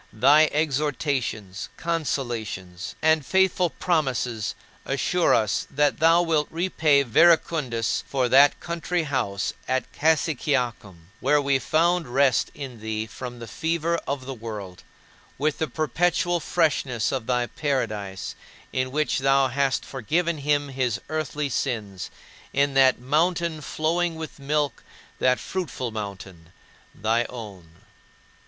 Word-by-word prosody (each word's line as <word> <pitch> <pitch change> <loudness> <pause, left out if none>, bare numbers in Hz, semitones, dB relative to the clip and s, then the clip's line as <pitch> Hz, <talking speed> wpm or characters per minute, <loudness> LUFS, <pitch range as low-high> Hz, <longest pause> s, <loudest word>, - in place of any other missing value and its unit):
Thy 150 +8 +6
exhortations, 135 -9 -1
consolations, 120 - -3
and 160 -1 +4
faithful 190 +2 +2
promises 130 - -1 0.3
assure 165 +6 +2
us 110 -2 0
that 145 +1 +1
thou 165 +2 +5
wilt 155 -3 +1
repay 160 -4 +2
Verecundus 140 -4 +3
for 130 -2 +1
that 140 +3 +6
country 170 0 -2
house 125 -9 -1
at 130 0 -1
Cassiciacum 125 - 0
where 145 +3 +3
we 140 -1 +2
found 170 +3 +2
rest 135 +1 +2
in 130 -5 -7
thee 110 0 -3
from 120 +2 -8
the 120 - -8
fever 165 +3 -1
of 135 -1 -3
the 135 - -5
world 105 -6 -7 0.6
with 150 +2 0
the 160 - 0
perpetual 175 +5 0
freshness 140 -8 0
of 130 -4 -3
thy 125 -1 +1
paradise 110 - -3 0.4
in 130 0 0
which 150 0 0
thou 135 0 +3
hast 135 +1 0
forgiven 160 +6 -1
him 145 0 +1
his 130 -4 -1
earthly 150 -1 -2
sins, 110 -8 -3 0.4
in 140 0 +2
that 135 -1 +5
mountain 160 +4 0
flowing 165 +3 -1
with 160 -2 -8
milk, 145 0 -1 0.4
that 125 0 +3
fruitful 140 -10 -4
mountain 95 -5 -7 0.4
thy 115 +3 +1
own. 100 -10 -10
135 Hz, 120 wpm, -25 LUFS, 120-155 Hz, 0.6 s, Thy